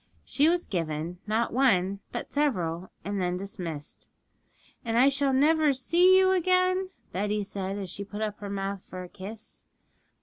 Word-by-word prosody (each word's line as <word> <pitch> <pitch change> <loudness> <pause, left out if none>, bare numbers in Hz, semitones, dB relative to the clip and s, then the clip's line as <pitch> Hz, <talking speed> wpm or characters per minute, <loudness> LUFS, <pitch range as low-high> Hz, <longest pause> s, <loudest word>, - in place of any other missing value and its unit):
She 295 +3 +3
was 350 +1 +1
given, 165 -1 -3
not 220 +2 0
one, 200 -7 +2
but 240 - -6
several, 185 - 0 0.2
and 200 0 -2
then 180 0 0
was 180 - -4
dismissed. 170 -6 -6 0.7
'And 230 -2 -1
I 260 +3 +6
shall 275 0 +1
never 300 +2 +4
see 345 +8 +5
you 375 0 +5
again,' 370 +1 +2 0.2
Betty 210 +2 -1
said, 195 0 -4
as 190 -3 -4
she 200 - -5
put 205 +2 -5
up 210 -1 -3
her 205 - -6
mouth 195 -1 -3
for 185 0 -8
a - - -8
kiss. 205 +4 -9
210 Hz, 170 wpm, -28 LUFS, 185-285 Hz, 0.7 s, I